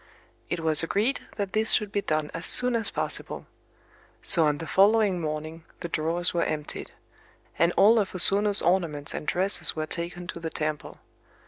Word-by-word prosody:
It 175 - -5
was 160 -2 +6
agreed 210 +10 -2 0.2
that 200 -3 -6
this 220 +1 0
should 210 -2 0
be 205 - -3
done 155 -4 -4
as 165 0 -5
soon 250 -1 +4
as 225 -2 +1
possible. - - -3 0.8
So 165 -3 +6
on 150 -1 -2
the 165 - -9
following 200 0 +1
morning 155 +1 -7 0.2
the 170 - -7
drawers 165 +3 -2
were 170 - -2
emptied; 150 -1 -7 0.7
and 170 +1 +1
all 220 +3 +3
of 195 -2 -5
O - - -4
Sono's 200 +3 +5
ornaments 165 -5 -2
and - - -8
dresses 190 +3 +4
were 155 0 -4
taken 175 +2 -7
to 175 - -9
the 165 -1 -7
temple. 155 -1 -6
175 Hz, 180 wpm, -24 LUFS, 155-200 Hz, 0.8 s, was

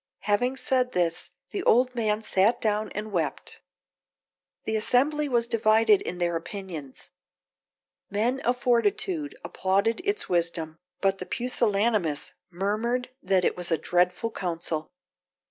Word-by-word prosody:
Having 230 +6 +1
said 260 -3 +1
this, 170 -2 0 0.2
the 395 - -2
old 250 -5 +3
man 220 -2 0
sat 210 +4 +2
down 215 -1 0
and 215 +1 -5
wept. 160 -7 -3 1.0
The 220 - -1
assembly 285 +7 +2
was 235 -2 +2
divided 220 -2 +4
in 180 - -4
their 175 -1 0
opinions. 165 - -7 1.0
Men 230 +6 0
of 250 -1 0
fortitude 255 - 0
applauded 200 +4 0
its 415 +1 -1
wisdom, 165 -2 -1 0.2
but 195 -1 +1
the 185 - -6
pusillanimous 210 - +1 0.2
murmured 215 +8 -1
that 185 -1 +2
it - - +1
was 180 -1 -1
a 165 - +2
dreadful 180 +6 +1
counsel. 165 -5 -3
210 Hz, 130 wpm, -26 LUFS, 180-245 Hz, 1.0 s, divided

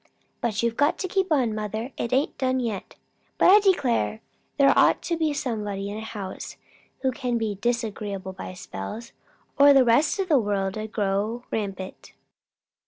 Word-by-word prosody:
"But 230 -2 -1
you've 235 -1 0
got 290 +2 +3
to 375 - -3
keep 380 -1 0
on, 255 -7 +2
mother; 215 +4 -4
it 235 - -3
ain't 270 +3 +1
done 260 -1 +1
yet. 225 -6 -4 0.4
But - - +6
I 415 - +9
declare! 270 - +1 0.4
there 275 -1 +6
ought - - +4
to 340 - -1
be 320 -2 0
somebody 210 -7 -3
in 210 - -5
a - - -5
house 205 -4 -7 0.5
who 260 - +2
can 250 -2 -2
be 220 -2 -1
disagreeable 210 -5 -2
by 185 0 -8
spells, 180 - -7 0.5
or 285 0 +8
the 270 -2 +6
rest 240 - +3
of 390 -2 -1
the 300 -6 +4
world'd 205 0 -2
grow 210 +3 -1
rampant." 195 -3 -5
230 Hz, 170 wpm, -25 LUFS, 205-270 Hz, 0.5 s, I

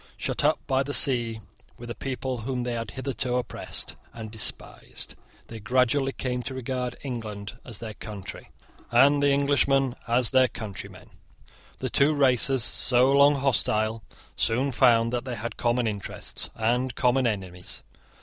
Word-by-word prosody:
Shut - - -2
up - - +3
by 130 0 +2
the 140 +1 -1
sea 115 -4 +3 0.4
with 120 0 -9
the - - -3
people 130 0 -4
whom 125 +2 -3
they 120 0 -2
had 115 -2 -3
hitherto 130 -1 -2
oppressed 125 - -4 0.2
and 110 -2 -8
despised, 110 -2 -3 0.3
they 115 - -9
gradually 130 +4 +2
came 125 -2 -3
to 130 +1 -6
regard 125 -1 -3
England 110 -6 -5
as 115 -5 -5
their 110 -1 -6
country, 100 -1 -8 0.4
and 140 +4 +5
the 145 - +4
English 140 0 +3 0.4
as 120 0 +2
their 130 -1 +5
countrymen. 110 -4 -8 0.7
The - - -3
two 150 +2 +4
races, 130 -2 +3
so 125 +2 +2
long 140 +1 +6
hostile, 110 -5 0 0.3
soon 130 +5 +1
found 115 -2 +4
that 120 -1 -1
they 130 -2 -4
had 115 +2 -5
common 120 0 +1
interests 105 -3 -5
and 120 +3 0
common 125 0 +3
enemies. 95 -5 -5
125 Hz, 150 wpm, -26 LUFS, 115-130 Hz, 0.7 s, long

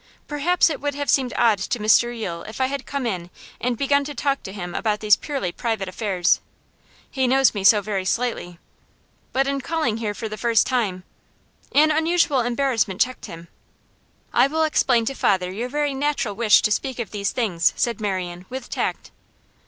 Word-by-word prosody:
'Perhaps 325 +4 +2
it 295 - -5
would 290 -1 -2
have 285 0 -1
seemed 260 -3 +2
odd 220 -4 +3
to 195 - -2
Mr 220 +2 +4
Yule 190 -8 -5
if 220 - -8
I 260 - +3
had 275 0 -4
come 280 -2 -3
in 180 -6 -3 0.3
and 245 -1 -1
begun 280 +2 +2
to 295 0 -6
talk 275 -1 0
to 190 - -8
him 180 -3 -6
about 210 -2 -1
these 210 -2 +5
purely 275 - -3
private 220 -2 -3
affairs. 185 -2 +1 0.7
He 260 -1 0
knows 265 +1 +4
me 200 -3 -4
so 210 +1 +6
very 200 -2 -2
slightly. 185 -4 -2 0.7
But, 270 +1 +1
in 275 0 -1
calling 310 -7 -1
here 215 -2 -3
for 225 - -5
the 215 -1 -7
first 230 -1 +3
time 210 -8 -1 0.4
' - - -35
An 310 0 +4
unusual 320 -2 +2
embarrassment 245 -5 0
checked 255 0 0
him. 165 +1 -10 0.9
'I - - +5
will 320 +3 0
explain 255 -6 +2
to 275 - -2
father 185 -7 +1
your 230 +6 -4
very 290 +1 -1
natural 275 -5 -1
wish 220 -1 +4
to 215 - +1
speak 260 +3 -1
of 235 -4 -5
these 200 -1 -1
things,' 185 -9 +1
said 235 -3 -1
Marian, 185 -3 -3
with 260 -1 -7
tact. - - -3
235 Hz, 190 wpm, -22 LUFS, 200-275 Hz, 0.9 s, so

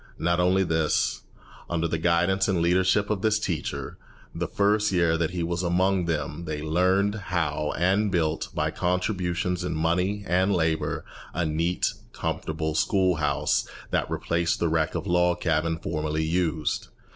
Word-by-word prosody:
Not 85 +1 +1
only 90 +2 +3
this; 80 -3 +1 0.5
under 85 -1 0
the 80 0 -2
guidance 90 +3 +2
and 95 -4 +1
leadership 95 +4 +2
of 100 -3 -1
this 110 0 +3
teacher, 85 -7 -4 0.3
the 85 +1 -2
first 105 +1 +2
year 85 -3 +3
that 85 -1 0
he 90 -2 -3
was 85 +1 -1
among 90 +1 +2
them 80 0 -3
they 75 -2 -3
learned 95 +5 +2 0.2
how 75 -4 0
and 95 +5 +2
built, 80 -4 0
by - - 0
contributions 90 -1 -1
in 90 -3 -2
money 90 +6 0
and 95 +3 +2
labour, 80 -2 0 0.3
a 85 -1 0
neat, 85 +3 0 0.2
comfortable 80 0 -3
school 95 +2 +2
house 75 - 0 0.2
that - - 0
replaced 85 0 0
the 85 - +1
wreck 80 0 0
of - - -3
a 95 - -2
log 90 0 +3
cabin 80 -1 0
formerly 80 -1 -2
used. 80 -2 -1
85 Hz, 155 wpm, -26 LUFS, 80-95 Hz, 0.5 s, only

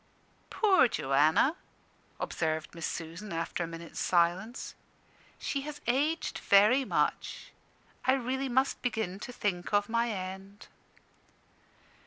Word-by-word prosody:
"Poor 395 - +4
Joanna!" 155 - +3 0.6
observed 155 -1 -2
Miss 165 -1 -3
Susan, 170 +5 -6
after 165 +1 -2
a - - -3
minute's 165 0 -8
silence. 180 +7 +1 0.6
"She 280 - -2
has 295 +1 -7
aged 290 +7 0
very 210 +7 +5
much. - - -1 0.5
I 260 - +5
really 265 +1 -1
must 260 +2 +1
begin 220 -6 -2
to 250 - -7
think 190 -7 -2
of 205 +1 +2
my 235 +1 +1
end." 195 0 -6
205 Hz, 115 wpm, -30 LUFS, 170-260 Hz, 0.6 s, very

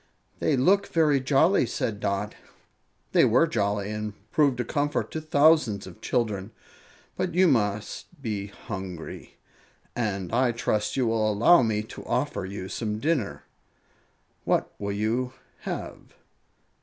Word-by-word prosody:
"They 145 - +2
look 195 +10 +3
very 150 -4 +3
jolly," 135 +4 +3
said 110 -2 -2
Dot. 100 +1 -2 0.8
"They - - +5
were 125 +8 +5
jolly, 100 -6 -1
and 105 -1 -4 0.2
proved 140 -5 +3
a - - +1
comfort 145 +3 -1
to 160 - -4
thousands 155 -8 +3
of 95 -2 -12
children. 110 -5 -1 0.7
But 180 -2 -2
you 185 +1 +5
must 105 -7 0
be 105 -6 -3
hungry, 95 -4 -8 0.6
and 100 -5 -2
I 120 0 +3
trust 105 0 -1
you 130 - +2
will 110 -1 +1
allow 120 +12 +6
me 110 -3 0
to 110 - -10
offer 125 -5 -1
you 95 -1 -6
some 105 +1 -3
dinner. 135 -4 -1 1.0
What - - 0
will 100 0 -2
you 115 +5 -1 0.3
have?" - - -7
115 Hz, 135 wpm, -26 LUFS, 105-145 Hz, 1.0 s, allow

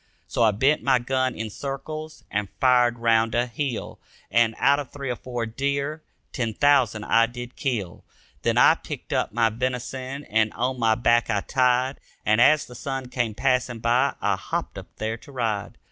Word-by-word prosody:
So - - -3
I 115 - +6
bent 130 +9 +2
my 135 -2 +3
gun 130 +1 -1
in 110 -1 -5
circles 155 +5 -6
and 100 -1 -1
fired 125 -2 +4
round 115 -1 +2
a 120 +1 +2
hill. 125 0 -4 0.3
And, 115 -1 +3
out 140 +1 +4
of 140 -4 -6
three 140 -3 -5
or - - -2
four 120 -1 -4
deer, 140 +6 -2 0.3
ten 115 -5 -2
thousand 130 -7 +3
I 115 +2 +4
did 120 +1 -8
kill. 110 -10 -3 0.4
Then - - +1
I - - +7
picked - - -7
up - - 0
my 115 0 +2
venison 130 +3 -4
and 110 0 +1
on 130 +1 -2
my 110 -1 +3
back 120 0 +2
I 105 -3 +1
tied 130 +2 +1 0.3
And 110 +2 +3
as 150 +3 +5
the 125 - -12
sun 135 0 -5
came 120 -4 -2
passing 125 -1 +1
by 120 +4 +2
I - - +1
hopped - - -4
up - - -11
there 110 +1 -3
to 140 - -15
ride. 115 -6 -2
125 Hz, 185 wpm, -24 LUFS, 115-135 Hz, 0.4 s, I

